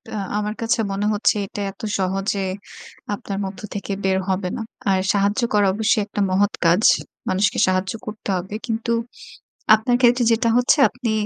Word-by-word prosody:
আ - - -2 0.2
আমার 210 0 -2
কাছে 230 +1 +1
মনে 200 +1 -2
হচ্ছে 210 +1 +2
এটা 205 - -6
এত 195 - -17 0.2
সহজে 195 +2 -1 0.7
আপনার 200 -1 -5
মধ্য 190 0 -7
থেকে 200 0 -5
বের 190 0 +2
হবে 185 -1 -1
না। - - -4 0.3
আর 190 -1 +3
সাহায্য 205 +4 +1
করা 205 -1 +4
অবশ্যই 215 0 +2
একটা 205 0 -4
মহৎ 200 +2 +2
কাজ। 170 +5 +4 0.5
মানুষকে 190 +2 +1
সাহায্য 185 0 0
করতে 215 -1 -7
হবে। 190 +4 -6
কিন্তু 230 0 -2 0.8
আপনার 230 +3 0
ক্ষেত্রে 245 0 +4
যেটা 230 +1 +2
হচ্ছে 250 +5 +4
আপনি 245 -3 -3
205 Hz, 165 wpm, -21 LUFS, 195-225 Hz, 0.8 s, করা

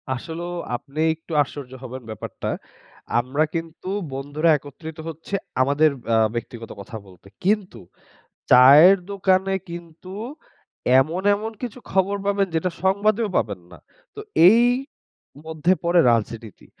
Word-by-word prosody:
আসলেও 170 +6 -6 0.2
আপনি 140 +5 -8 0.2
একটু 160 +1 -17
আশ্চর্য 140 -2 -5
হবেন 130 +1 -7
ব্যাপারটা। 110 - -6 0.7
আমরা 130 +5 0
কিন্তু 165 +2 -5 0.2
বন্ধুরা 145 +4 -1
একত্রিত 150 +3 -10
হচ্ছি 165 +4 -9 0.3
আমাদের 145 +4 +3 0.2
আ - - +4 0.2
ব্যক্তিগত 115 -1 -6
কথা 110 +3 -8
বলতে। 95 0 -18 0.2
কিন্তু 200 - 0 0.7
চায়ের 145 +10 +8
দোকানে 190 -1 +1 0.2
কিন্তু 170 +1 -10 0.9
এমন, 165 +7 -2
এমন 220 +2 -5
কিছু 245 -1 -5
খবর 195 +1 +1
পাবেন 200 -1 +1
যেটা 165 +3 0
সংবাদেও 205 +3 +2
পাবেন 105 -4 -1
না। - - -12 0.4
তো - - -8 0.3
এই 230 +4 +6 0.8
মধ্যে 160 +2 +1
পরে 170 +1 +4
রাজনীতি। 115 -2 -4
160 Hz, 120 wpm, -22 LUFS, 130-190 Hz, 0.9 s, চায়ের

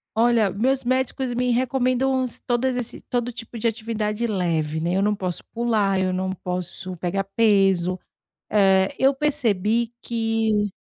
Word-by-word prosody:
Olha, 230 -2 +3
meus 250 +8 0
médicos 255 0 -1
me 250 0 0
recomendam 255 +1 +1 0.2
todas 250 +1 +1
esse 245 -2 -4
todo 245 0 -2
tipo 230 0 -9
de 230 - +1
atividade 220 0 -2
leve, 165 -7 -1
né. 170 +2 -1
Eu 195 - +2
não 210 +1 +2
posso 185 -3 -3
pular, 215 -5 +1
eu 185 0 +1
não 185 +1 -1
posso 180 0 -4
pegar 185 +3 -1
peso. 195 -3 +2 0.5
Eh, 190 -2 +3
eu 270 +1 +4
percebi 235 -6 0
que 225 -2 0
220 Hz, 145 wpm, -23 LUFS, 190-240 Hz, 0.5 s, eu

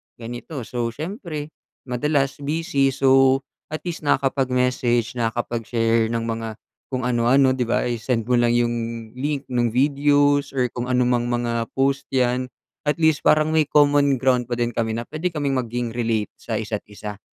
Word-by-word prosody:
ganito. 120 +4 -7
So, 120 +1 -2
siyempre, 155 - -5 0.3
madalas 135 +2 0
busy, 150 0 0
so, 135 0 +4 0.2
at 155 - -6
least 170 -4 -5
nakakapag-message, 125 -3 +1
nakakapag-share 115 0 0
ng 115 0 -2
mga 115 -1 -4 0.3
kung 130 -1 -3
ano-ano, 125 +2 +3
'di 125 -2 -1
ba, 120 - +2
isi-send 120 0 -1
mo 125 0 +2
lang 120 0 +3
yung 120 0 +2 0.4
link, 140 +2 -2
nung 120 -1 +2
videos 145 +1 +3
or 125 -2 +1
kung 120 0 -4
anumang 125 -1 +2
mga 120 -1 -1
post 135 +1 +1
yan, 125 0 +1 0.4
at 150 - +1
least 160 -2 +3
parang 155 +1 +3
may 155 -2 +2
common 145 -2 +4
ground 125 -1 +1
pa 120 - -2
din 120 0 -1
kami 110 0 -1
na 120 - -4
puwede 155 +7 -3
kaming 145 -4 -2
maging 120 -2 -2
relate 115 -3 -1
sa 110 -2 -3
isa't-isa. 105 -1 -6
125 Hz, 155 wpm, -22 LUFS, 120-140 Hz, 0.4 s, so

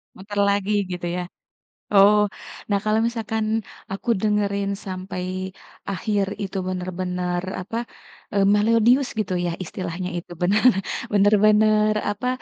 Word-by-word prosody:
Muter 205 +2 -5
lagi, 200 +1 0 0.2
gitu 175 -1 -4
ya? 180 +1 -2 0.7
Oh, 205 +1 +7 0.5
nah, 200 -1 +2
kalau 215 0 +2
misalkan 220 -2 -2 0.5
aku 195 +4 -5
dengerin 200 -2 +1 0.2
sampai 185 0 -5 0.3
akhir 200 0 0 0.2
itu 195 0 -4
benar-benar, 180 -1 -2 0.2
apa, 225 +5 -5 0.6
eee, 200 -1 +3
melodius, 230 +5 +4
gitu 190 -3 -1
ya, 170 - 0
istilahnya, 180 +1 -5
itu 175 - -8
benar 205 +7 +2 0.5
benar-benar, 215 +1 +4 0.2
apa, 205 +5 -3
200 Hz, 115 wpm, -23 LUFS, 185-215 Hz, 0.7 s, Oh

